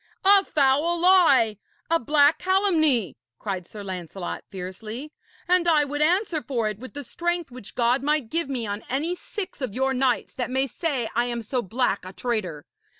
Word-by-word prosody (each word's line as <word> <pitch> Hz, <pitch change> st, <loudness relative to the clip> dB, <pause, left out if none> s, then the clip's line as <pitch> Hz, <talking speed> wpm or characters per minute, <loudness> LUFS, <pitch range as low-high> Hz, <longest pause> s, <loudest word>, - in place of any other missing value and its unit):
'A 395 Hz, 0 st, +7 dB
foul 295 Hz, +5 st, +2 dB
lie, 330 Hz, -, +5 dB, 0.3 s
a 330 Hz, -, +4 dB
black 290 Hz, +4 st, +4 dB
calumny!' 315 Hz, -, +2 dB, 0.2 s
cried 185 Hz, -, -4 dB
Sir 210 Hz, -1 st, -9 dB
Lancelot 185 Hz, -1 st, -6 dB
fiercely. 215 Hz, +9 st, -7 dB, 0.3 s
'And 355 Hz, -1 st, +3 dB
I 305 Hz, -3 st, +4 dB
would 290 Hz, +1 st, -3 dB
answer 345 Hz, 0 st, +2 dB
for 235 Hz, -7 st, -1 dB
it 215 Hz, -1 st, -4 dB
with 260 Hz, +3 st, -10 dB
the 285 Hz, -, -5 dB
strength 345 Hz, +2 st, -2 dB
which 245 Hz, -4 st, -11 dB
God 245 Hz, +2 st, +2 dB
might 295 Hz, -4 st, 0 dB
give 330 Hz, -3 st, 0 dB
me 250 Hz, -4 st, -2 dB
on 205 Hz, 0 st, -4 dB
any 300 Hz, +7 st, 0 dB
six 370 Hz, -2 st, -6 dB
of 250 Hz, -6 st, -3 dB
your 265 Hz, +1 st, +1 dB
knights 255 Hz, -2 st, 0 dB
that 250 Hz, -, -3 dB
may 265 Hz, +1 st, +1 dB
say 275 Hz, -2 st, -2 dB
I 240 Hz, -, +2 dB
am 240 Hz, -1 st, -3 dB
so 250 Hz, +3 st, -1 dB
black 230 Hz, 0 st, -1 dB
a 185 Hz, +1 st, -9 dB
traitor. 185 Hz, -11 st, -3 dB
265 Hz, 180 wpm, -25 LUFS, 220-320 Hz, 0.3 s, A